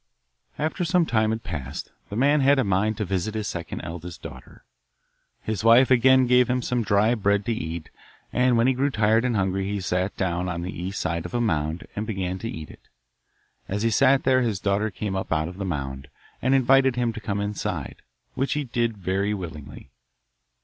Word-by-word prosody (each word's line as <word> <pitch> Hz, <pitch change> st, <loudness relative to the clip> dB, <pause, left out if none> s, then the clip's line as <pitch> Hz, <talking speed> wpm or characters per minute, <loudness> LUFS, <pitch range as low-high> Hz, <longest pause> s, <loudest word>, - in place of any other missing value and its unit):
After 160 Hz, +4 st, -1 dB
some 175 Hz, 0 st, +2 dB
time 110 Hz, -5 st, +1 dB
had 110 Hz, +1 st, -2 dB
passed 75 Hz, -4 st, -6 dB, 0.2 s
the 100 Hz, -, -6 dB
man 140 Hz, +5 st, +3 dB
had 140 Hz, +1 st, +5 dB
a 130 Hz, -, +3 dB
mind 100 Hz, +2 st, +1 dB
to 105 Hz, -, -1 dB
visit 95 Hz, +3 st, -2 dB
his 105 Hz, -2 st, -2 dB
second 85 Hz, -2 st, -5 dB
eldest 85 Hz, +2 st, -8 dB
daughter. 65 Hz, 0 st, -11 dB, 0.8 s
His 110 Hz, -2 st, -3 dB
wife 120 Hz, +3 st, +6 dB
again 130 Hz, +1 st, +6 dB
gave 125 Hz, 0 st, +4 dB
him 125 Hz, 0 st, 0 dB
some 125 Hz, 0 st, 0 dB
dry 105 Hz, +1 st, +3 dB
bread 100 Hz, -2 st, +1 dB
to 115 Hz, -, 0 dB
eat, 80 Hz, -6 st, -5 dB, 0.4 s
and 125 Hz, -1 st, +3 dB
when 115 Hz, -, +3 dB
he 130 Hz, -, +4 dB
grew 135 Hz, +3 st, +1 dB
tired 110 Hz, -1 st, +2 dB
and 125 Hz, -2 st, 0 dB
hungry 95 Hz, 0 st, 0 dB
he 100 Hz, 0 st, -2 dB
sat 90 Hz, +1 st, -1 dB
down 90 Hz, -1 st, -1 dB
on 85 Hz, -1 st, -3 dB
the 90 Hz, -, -5 dB
east 95 Hz, +3 st, -4 dB
side 85 Hz, 0 st, -2 dB
of -, -, -8 dB
a -, -, +1 dB
mound 80 Hz, -7 st, -1 dB
and 105 Hz, +1 st, -3 dB
began 95 Hz, -4 st, -3 dB
to 115 Hz, -, -4 dB
eat 80 Hz, -6 st, -7 dB
it. -, -, -18 dB, 0.8 s
As 105 Hz, +3 st, -2 dB
he 115 Hz, -, +2 dB
sat 135 Hz, +4 st, +4 dB
there 130 Hz, -1 st, +3 dB
his 110 Hz, -5 st, -1 dB
daughter 100 Hz, +2 st, 0 dB
came 100 Hz, -1 st, -4 dB
up 95 Hz, -, -4 dB
out 80 Hz, -1 st, +1 dB
of 90 Hz, +2 st, -9 dB
the 100 Hz, -, -2 dB
mound, 70 Hz, -5 st, -4 dB, 0.3 s
and 130 Hz, +2 st, +3 dB
invited 135 Hz, 0 st, +4 dB
him 120 Hz, -2 st, 0 dB
to 115 Hz, -, -7 dB
come 100 Hz, -1 st, -2 dB
inside, 105 Hz, 0 st, -3 dB, 0.4 s
which 135 Hz, -, -1 dB
he 150 Hz, -, -1 dB
did 120 Hz, -3 st, -1 dB
very 100 Hz, +2 st, -1 dB
willingly. 80 Hz, -7 st, -9 dB
105 Hz, 205 wpm, -25 LUFS, 90-125 Hz, 0.8 s, wife